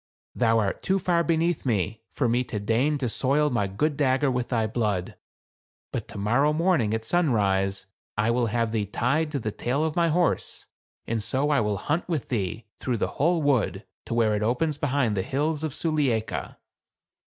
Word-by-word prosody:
"Thou 115 -2 +3
art 100 -3 0
too 190 - +1
far 175 -2 +1
beneath 165 0 +1
me 110 -2 -1
for 130 - 0
me 120 +2 +2
to 110 -4 -4
deign 120 +9 +1
to 135 -3 -1
soil 140 +5 +1
my 105 -5 +1
good 140 +11 -1
dagger 135 -1 +2
with 125 -1 -2
thy 115 -3 +1
blood; 105 -5 -1 0.8
but - - -4
to - - -9
morrow 120 +9 +2
morning, 165 - +2
at 110 0 -4
sunrise, 100 - +1 0.3
I 110 +2 +2
will 120 0 +1
have 115 0 0
thee 105 -3 -1
tied 135 +9 0
to 145 - -1
the 110 -5 -3
tail 135 +9 -1
of 160 - -2
my 170 -1 +3
horse, 170 +1 0 0.4
and 115 -1 -1
so 130 +7 0
I 145 - +4
will 105 -1 0
hunt 155 - -2
with 160 -6 -2
thee 110 -1 -2
through 125 -2 -1
the - - -1
whole 165 +1 +3
wood, 110 -9 +1 0.2
to 115 - -2
where 110 -2 +3
it 105 - -1
opens 125 +8 +1
behind 135 -6 +1
the 95 - +1
hills 150 +7 -1
of 155 - -1
Sulieika." 135 -9 -1
125 Hz, 190 wpm, -26 LUFS, 110-150 Hz, 0.8 s, I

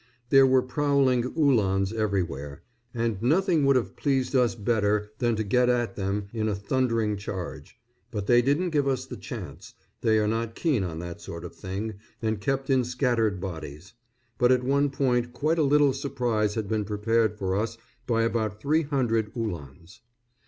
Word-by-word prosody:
There 135 -1 +7
were 130 -1 +4
prowling 135 -2 +2
Uhlans 105 -9 +2
everywhere, 85 -10 -2 0.3
and 115 -4 -2
nothing 160 - +2
would 140 - +5
have 125 - 0
pleased 135 -2 0
us 120 -6 +3
better 105 -1 0
than 120 -2 +1
to 110 - -1
get 125 +4 +2
at 120 -1 0
them 100 +1 -2
in 110 -1 -1
a 105 - -1
thundering 115 0 0
charge; 95 -3 -7 0.3
but 105 -4 -4
they 120 +2 +5
didn't 145 +8 +1
give 145 -3 +1
us 135 -2 0
the - - -8
chance, - - -8 0.3
they 110 -1 +3
are 105 -1 +2
not 115 +1 -2
keen 145 - +1
on 85 -3 -4
that 85 -1 -7
sort 85 +1 -7
of 85 - -8
thing, 100 +2 -5 0.2
and 110 -2 -2
kept 135 +4 -1
in 130 -1 +4
scattered 120 -5 0
bodies. 90 0 -7 0.5
But 125 0 +4
at 125 -1 +3
one 140 +2 +2
point 125 -3 0
quite 155 +5 0
a - - +4
little 145 -1 +4
surprise 120 -6 -1
had 110 -3 -2
been 110 0 0
prepared 105 +1 0
for 95 -2 -1
us 115 +3 -2 0.3
by 115 -2 +2
about 110 -3 -1
three 150 +7 +2
hundred 120 -8 0
Uhlans. 85 - -6
115 Hz, 175 wpm, -26 LUFS, 100-130 Hz, 0.5 s, There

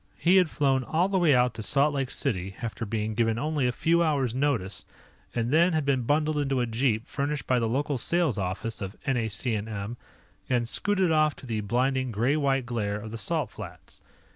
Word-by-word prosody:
He 180 +3 +4
had 180 -4 +4
flown 135 -3 +1
all 165 +7 +1
the 195 -1 +1
way 160 -6 +4
out 125 -1 +3
to 110 - -7
Salt 140 +7 +2
Lake 135 -3 -1
City 95 -10 -1
after 115 0 -4
being 110 0 -2
given 115 0 +1
only 150 -1 0
a - - +1
few 170 +6 +2
hours 140 -7 +1
notice, 125 -8 -1 0.5
and 120 0 -1
then 170 +3 +4
had 155 -2 0
been 135 -2 +2
bundled 150 +4 +1
into 135 -2 0
a 120 - +1
jeep 115 0 0
furnished 145 0 -2
by 125 -1 +2
the 115 -1 0
local 140 +2 -1
sales 165 - +2
office 100 +5 -3
of 95 +1 -5
NAC&M 110 -2 -2 0.5
and 120 -2 +1
scooted 190 - +1
off 155 -2 +3
to - - -12
the 110 -3 -2
blinding 130 +4 0
gray 120 +7 +1
white 135 -4 +1
glare 105 -4 -2
of 110 +1 -8
the 115 - -5
Salt 95 - -1
Flats. - - -10
130 Hz, 200 wpm, -27 LUFS, 115-145 Hz, 0.5 s, He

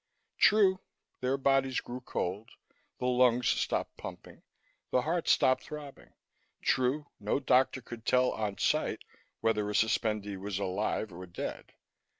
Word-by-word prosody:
True, 195 -3 +5 0.4
their 130 +2 0
bodies 135 -1 +2
grew 125 +1 -7
cold, 105 -2 -3 0.5
the - - -4
lungs 125 -1 +3
stopped - - -1
pumping, - - -9 0.5
the 125 - +2
heart 170 +3 -1
stopped 130 - +4
throbbing; 150 -2 -10 0.5
true, 130 +4 +1
no 105 +6 0
doctor 130 -1 +2
could 120 -2 -9
tell, 125 +1 +3
on 105 -3 -3
sight, - - 0 0.4
whether 105 -2 +1
a 105 - -3
suspendee 105 -2 +1
was 95 0 -4
"alive" 100 +1 -2
or 90 +2 -8
"dead." 85 - -6
125 Hz, 135 wpm, -31 LUFS, 105-130 Hz, 0.5 s, True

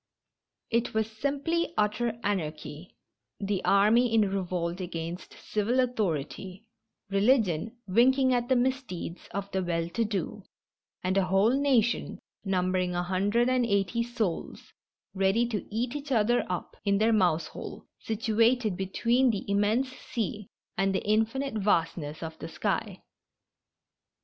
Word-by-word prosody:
It 230 -1 0
was 220 0 0
simply 285 +8 -1
utter 215 +2 0
anarchy 155 -3 -4 0.2
— - - -57
the 200 -2 -1
army 220 +5 +4
in 210 -3 +3
revolt 180 -1 -2
against 170 0 -6
civil 220 +4 -1
authority, 195 - -2 0.5
religion 215 - +2
winking 260 +6 +4
at 245 0 0
the 260 - +4
misdeeds 245 -9 -2
of 200 +1 -4
the 190 - 0
well 170 -2 -1
to 230 +7 0
do, 210 -1 -3 0.6
and 185 +1 +1
a 195 - +3
whole 195 +5 +3
nation, 255 -5 +1 0.3
numbering 185 -2 0
a 175 - 0
hundred 200 +6 +1
and 255 -1 +2
eighty 200 +1 +1
souls, 230 -7 -3 0.4
ready 195 +4 +2
to 215 -3 -3
eat 240 +5 -2
each 290 -1 -6
other 240 0 +2
up 180 - -4
in 200 -1 +2
their 220 +2 +3
mouse 175 -6 +3
hole, - - -8
situated 225 0 +1
between 235 +7 +2
the 210 -4 -2
immense 210 +6 +2
sea 215 -5 -4 0.3
and 195 0 +2
the - - -2
infinite 225 +6 +1
vastness 165 -7 0
of 160 0 -7
the 160 - -6
sky.' - - -2
210 Hz, 135 wpm, -28 LUFS, 185-240 Hz, 0.6 s, army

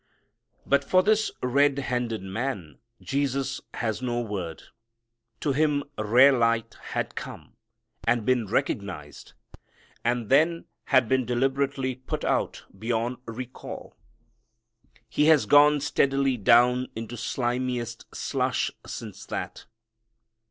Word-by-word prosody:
But 140 - +3
for 185 0 +3
this 215 +1 +3
red 140 +2 +3
handed 120 -5 -2
man 95 - -4 0.2
Jesus 140 0 -1
has 110 0 -2
no 120 -2 -1
word. 95 -8 -5 0.8
To 145 - +1
him 145 0 +2
rare 120 +6 +6
light 115 -3 +1
had - - -3
come - - -8 0.5
and 115 -2 +2
been 125 -4 +2
recognized, 95 -7 -3 0.7
and 120 -2 0
then 160 +5 +3 0.2
had 130 -3 +4
been 130 +2 +2
deliberately 135 +2 0
put 130 +1 -5
out - - -1
beyond 115 +4 -2
recall. 125 +2 -8 1.1
He 150 +6 +1
has 155 -2 +5
gone 145 0 +6
steadily 140 -2 +2
down 125 +3 +4
into 115 +1 -6
slimiest 120 0 -2
slush - - -1
since - - -8
that. - - -5
125 Hz, 110 wpm, -26 LUFS, 115-140 Hz, 1.1 s, rare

